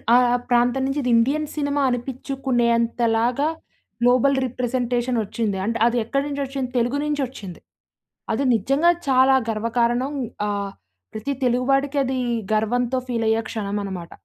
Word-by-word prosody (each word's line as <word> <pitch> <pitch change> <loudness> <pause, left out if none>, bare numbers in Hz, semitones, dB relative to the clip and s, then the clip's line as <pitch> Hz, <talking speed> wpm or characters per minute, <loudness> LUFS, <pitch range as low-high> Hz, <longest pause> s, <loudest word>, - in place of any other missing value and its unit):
ఆహ్, 245 0 +4
ప్రాంతం 245 +2 +2
నించి 275 +2 -1
ఇదిండియన్ 250 +6 +2
సినిమా 285 -1 0
అనిపిచ్చుకునే 255 0 -1
అంతలాగా, 235 +3 +1 0.5
గ్లోబల్ 255 +3 +4
రిప్రజెంటేషనొచ్చింది. 240 -4 -1
అంటే, 230 +1 -1
అది 240 - 0
ఎక్కడ 275 +4 0
నుంచొచ్చింది, 275 -2 -3
తెలుగు 245 +4 +1
నించొచ్చింది. 260 - -4 0.7
అది 275 - 0
నిజ్జంగా 275 - +3 0.2
చాలా 260 +1 +5
గర్వకారణం. 235 +4 0 0.4
ఆహ్, 200 -1 -2 0.4
ప్రతి 270 +6 -3
తెలుగు 250 +1 +1
వాడికి 275 +1 +1
అదీ 260 0 -1 0.3
గర్వంతో 240 +4 +1
ఫీలయ్యే 225 -1 +1
క్షణమనమాట. 200 -5 -4
245 Hz, 115 wpm, -22 LUFS, 230-270 Hz, 0.7 s, చాలా